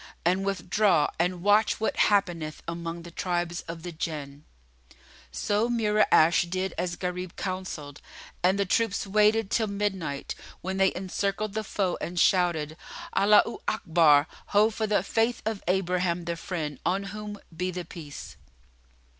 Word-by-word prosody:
and 185 +3 +2
withdraw 195 -2 +2
and 175 0 0
watch 210 +2 +4
what 220 - 0
happeneth 175 -6 +1
among 170 0 -5
the 170 - -10
tribes 175 0 -2
of 165 -1 -7
the 175 - -5
Jinn." 150 -3 -5 0.9
So 210 +3 0
Mura'ash 210 -7 +3
did 185 +1 -2
as 175 -1 -2
Gharib 180 0 -4
counselled 185 -7 -5 0.4
and 185 +2 +3
the 200 - +1
troops 205 +2 +1
waited 210 +1 +3
till 220 -2 +2
midnight, 195 -8 -2 0.3
when 190 +1 -3
they 190 0 +4
encircled 195 +2 -2
the 220 0 -2
foe 195 -3 -1
and 175 0 -3
shouted 165 -5 +2 0.4
"Allaho 210 +3 +4
Akbar! 160 -7 +4 0.2
Ho 210 +2 +4
for 220 0 -2
the 205 -3 +2
Faith 225 +4 0
of 220 -2 -2
Abraham 180 -2 0
the 170 0 -2
Friend, 160 -4 -4
on 195 +2 0
whom 210 -1 -6 0.2
be 180 +3 -1
the 180 -1 -5
Peace!" 145 - -9
185 Hz, 145 wpm, -27 LUFS, 170-205 Hz, 0.9 s, watch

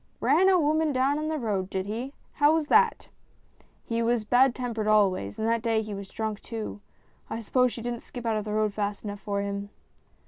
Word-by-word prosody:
" - - -40
Ran 380 +2 +5
a 370 -2 +5
woman 310 0 +2
down 275 +2 +1
in 310 - -2
the 315 0 -1
road, 200 -7 -2
did 190 -1 -2
he? 235 +7 -5 0.2
How 295 +2 +4
was 320 -2 0
that? 455 0 +3 0.3
" - - -37
" - - -35
He 230 0 -1
was 230 -1 +1
bad 245 +3 +4
tempered 235 -4 -3
always, 190 - +2
and 220 - -1
that 230 0 +1
day 225 -1 +1
he 210 -1 -6
was 200 -1 -7
drunk 220 -2 -4
too. 220 -3 -6 0.5
I 225 - -3
suppose 250 +3 +2
she 230 - -7
didn't 240 -1 -3
skip 245 0 -9
out 225 -1 +1
of 215 0 -2
the 210 - -3
road 215 -1 +1
fast 205 -1 -3
enough 205 -1 -5
for 200 -1 -2
him." 200 0 -4
225 Hz, 235 wpm, -27 LUFS, 210-260 Hz, 0.5 s, Ran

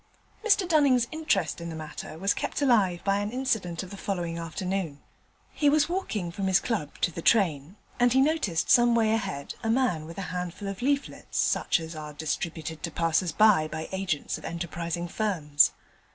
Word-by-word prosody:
Mr 405 -4 +3
Dunning's 280 -7 +4
interest 310 - 0
in 170 - -5
the 165 - -6
matter 155 0 -7
was 195 +4 +1
kept - - -3
alive 200 -10 +3
by 200 0 +2
an 205 0 -2
incident 220 -9 -1
of 185 - -10
the 200 - -8
following 175 -4 -3
afternoon. 170 -1 -3 0.5
He 290 - +3
was 295 0 +3
walking 220 - -2
from 190 +2 -3
his 190 -1 +4
club 205 - -3
to 175 - +2
the 170 - -6
train, 170 -6 +2 0.2
and 245 0 +4
he 260 - +4
noticed 270 - +1
some 240 -1 +6
way 220 -2 +3
ahead 140 -10 -3
a 225 - -2
man 225 -11 +1
with 165 - -10
a 195 - -3
handful 180 +2 -4
of 195 +2 -6
leaflets 280 +2 -2
such - - +2
as 165 0 -7
are 150 -1 -7
distributed 160 +1 -4
to 170 - -3
passers 165 +2 +1
by 205 -4 +5
by 160 +1 -6
agents 190 -6 -2
of - - -16
enterprising 170 +1 -4
firms. 160 -7 +2
185 Hz, 185 wpm, -27 LUFS, 165-230 Hz, 0.5 s, some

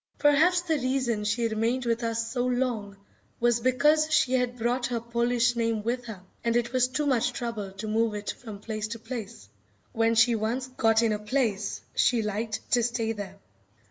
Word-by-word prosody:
Perhaps 315 +5 +4
the 320 -4 0
reason 255 -4 0
she 230 +2 +1
remained 230 +3 -1
with 235 0 0
us 230 0 -2
so 245 -2 -1
long 240 -5 -1 0.4
was 240 0 +3
because 300 +6 +3
she 260 -4 +3
had 250 -1 0
brought 245 +1 0
her 240 -2 -2
Polish 235 +1 +1
name 230 -2 0
with 245 +2 -2
her, 210 -5 -8 0.2
and 235 0 +1
it 240 +1 0
was 255 -1 +3
too 295 +4 -2
much 250 -3 +1
trouble 230 -5 -4
to 205 +3 -6
move 220 0 +1
it 205 0 -3
from 220 -4 -9
place 215 0 -4
to 230 +2 -5
place. 225 -1 -7 0.5
When 230 0 +2
she 230 +1 +5
once 225 +4 -1
got 225 -3 +2
in 225 - +2
a 210 - -2
place, 210 -2 -1
she 235 -3 +2
liked 210 +1 -4
to 245 - +4
stay 230 -1 -1
there. 200 -3 -6
235 Hz, 190 wpm, -27 LUFS, 220-250 Hz, 0.5 s, she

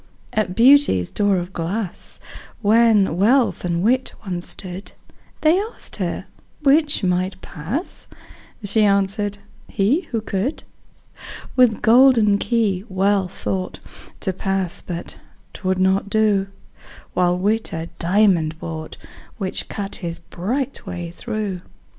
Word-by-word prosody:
At 195 -4 0
Beauty's 245 - +5
door 205 -2 +2
of 175 +1 -4
glass, 180 +3 -4 0.4
When 210 -5 +4
Wealth 240 +6 +3
and 170 0 -1
Wit 255 +4 +2
once 180 -2 -4
stood, 185 +1 -7 0.5
They 320 +4 +4
asked 445 +3 -8
her - - -3 0.4
'which 290 -2 +3
might 185 +1 0
pass?" 195 - -4 0.6
She 210 +2 +2
answered, 200 0 +1 0.3
"he, 265 - +1
who 230 - -1
could." 215 +6 -2 0.9
With 250 -4 +4
golden 230 -4 +6
key 210 -6 0
Wealth 190 0 +1
thought 185 -1 -2 0.4
To 190 - -1
pass 195 0 -2
but 170 -2 -6 0.3
'twould 185 -1 -1
not 190 +2 +2
do: 210 -2 +2 0.7
While 180 0 +2
Wit 215 +4 0
a 165 +1 -4
diamond 175 -4 +3
brought, 160 -1 -6 0.4
Which 190 -3 -4
cut 200 -2 -5
his 170 -2 -5
bright 240 +12 -3
way 175 -1 -5
through. 210 -2 -4
200 Hz, 120 wpm, -21 LUFS, 180-225 Hz, 0.9 s, golden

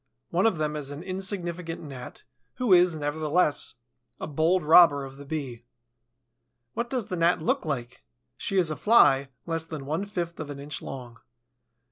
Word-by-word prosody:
One - - +3
of 220 - 0
them 150 -1 -1
is 145 -2 -3
an 145 +3 -7
insignificant 180 -3 -4
Gnat, 135 -4 -9 0.3
who 245 -6 +2
is, 175 -1 +5
nevertheless, 150 +1 0 0.4
a - - -4
bold 160 +4 +1
robber 150 -3 +6
of 135 0 -11
the 140 - -10
Bee. 135 -6 -5 1.1
What 235 +1 -3
does 250 -5 -1
the 185 - -4
Gnat 170 0 +2
look 160 - 0
like? 125 -5 -4 0.3
She 195 +8 -2
is 175 -4 +2
a - - -2
Fly, 140 - +4 0.2
less 165 -1 -2
than 155 -4 -7
one 155 +8 -2
fifth 175 -4 -4
of 155 -2 -5
an 145 - -6
inch 145 +1 -5
long. 120 -3 -8
160 Hz, 170 wpm, -27 LUFS, 145-180 Hz, 1.1 s, robber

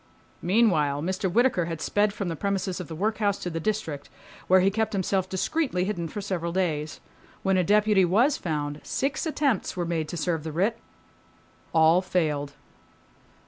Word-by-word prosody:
Meanwhile 165 -8 +2
Mr. 185 +1 -1
Whittaker, 235 -4 +3
had 165 -1 -4
sped 205 +5 +1
from 200 -2 -4
the 165 - -2
premises 190 0 -2
of 180 - -6
the 160 - -7
workhouse 205 +2 0
to 180 - -5
the 165 - -3
District, 165 -7 -3 0.4
where 185 +1 +6
he 195 +2 +3
kept 220 +1 -1
himself 190 -1 0
discreetly 190 - 0
hidden 180 -4 -2
for 205 - -6
several 180 -4 -3
days. 155 -5 -1 0.4
When 190 -1 +2
a 185 - +3
deputy 210 +1 +4
was 225 - +3
found, 145 -3 -3
six 285 +4 -2
attempts 280 - 0
were 175 - -1
made 165 -2 -2
to 175 - -5
serve 165 -2 -1
the 160 - -4
writ. 200 +9 0 0.9
All 165 +2 +5
failed. 150 -6 -1
185 Hz, 170 wpm, -26 LUFS, 165-210 Hz, 0.9 s, where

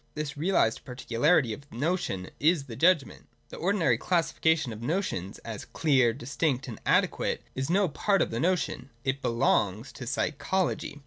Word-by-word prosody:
This 150 -1 -4
realised 150 -7 +1
particularity 125 +1 +1
of 140 +6 -11
the - - -13
notion 140 - -2
is 160 0 +3
the 125 -5 -9
Judgment. 165 -3 +2 0.2
The - - -9
ordinary 165 - +2
classification 160 -5 +1
of 110 - -9
notions, 120 - -2
as 110 -3 -6
clear, 130 -7 +2
distinct 135 +2 -2
and 115 - -8
adequate, - - +1
is 135 +2 -3
no 195 +2 +3
part 195 +5 +1
of - - -5
the 115 - -2
notion; 155 -5 -1
it 135 +1 -1
belongs 115 -1 +1
to 125 - -9
psychology. 155 +3 -1
140 Hz, 155 wpm, -28 LUFS, 120-165 Hz, 0.2 s, is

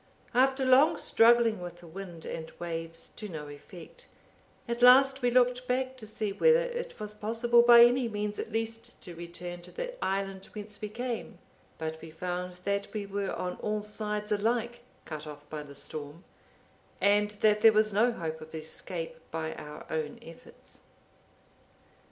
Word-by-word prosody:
After 265 +2 +3
long 275 +6 +5
struggling 230 -3 +4
with 175 -1 -7
the - - -13
wind 170 -1 -9
and 160 -1 -6
waves 165 -1 -6
to 210 - -6
no 155 -4 -6
effect, 160 +4 -12 0.6
at 235 0 -3
last 265 +2 +7
we 245 - +3
looked 250 0 +2
back 260 +1 0
to 220 -4 -6
see 215 -1 -2
whether 480 - +5
it - - -5
was 210 0 -4
possible 230 +3 +3
by 235 0 +9
any 245 0 +2
means 210 -1 -3
at - - -5
least 225 +1 -4
to 175 - -8
return 175 +1 -7
to 175 - -12
the - - -5
island 195 0 -2
whence 210 -1 -7
we 210 - -4
came, 240 +1 -5 0.4
but 160 0 -5
we 165 - -9
found 180 +2 -4
that 200 +1 -1
we 210 -2 -3
were 200 0 -3
on 180 0 -4
all 210 0 -2
sides 210 0 -2
alike 235 +3 0 0.2
cut 155 -1 -7
off 150 0 -10
by 155 -1 -4
the 140 -1 -11
storm, 150 +4 -6 0.8
and 205 +1 +3
that 210 -1 +4
there 225 - +8
was 215 -1 +3
no 230 +5 +4
hope 160 -7 -5
of 160 +1 -10
escape 165 +2 -5
by 160 0 -3
our 150 0 -9
own 155 -2 -3
efforts. 165 0 -14
210 Hz, 170 wpm, -29 LUFS, 170-235 Hz, 0.8 s, by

